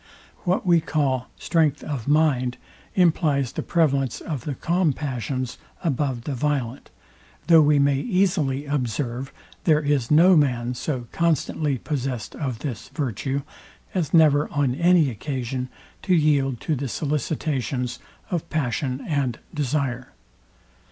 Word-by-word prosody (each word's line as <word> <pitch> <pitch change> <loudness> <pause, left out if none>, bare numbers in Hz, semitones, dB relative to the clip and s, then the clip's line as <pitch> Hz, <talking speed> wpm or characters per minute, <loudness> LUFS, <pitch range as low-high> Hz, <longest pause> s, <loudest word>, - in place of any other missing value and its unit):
What 180 +2 +1
we 170 -2 +4
call 135 -5 0
strength 155 -4 +1
of 140 -7 -4
mind, 145 -5 +2 0.4
implies 155 -7 +2
the - - -3
prevalence 140 -7 +1
of 145 -8 -5
the 145 - -3
calm 170 -1 +1
passions 130 -2 -4 0.2
above 135 -6 -1
the 145 - -3
violent; 135 -2 -2 0.6
though 165 -2 +7
we 150 0 +4
may 140 -1 +3
easily 170 - +1
observe, 130 -2 -2 0.3
there 155 -3 +5
is 145 -5 0
no 175 +5 +6
man 125 -5 +2
so 125 0 -3
constantly 155 -3 0
possessed 130 -3 -4
of 130 -6 -3
this 120 -7 -5
virtue, 135 - -2 0.5
as 175 -6 -1
never 150 -3 +5
on 145 -4 +1
any 170 -1 +4
occasion 130 +1 -4 0.3
to 185 -2 +2
yield 140 -6 +2
to 155 - 0
the 135 +1 -3
sollicitations 140 -3 -2 0.3
of 175 -4 -2
passion 135 -2 -2
and 140 -6 0 0.2
desire. 135 -3 -2
140 Hz, 130 wpm, -24 LUFS, 130-155 Hz, 0.6 s, though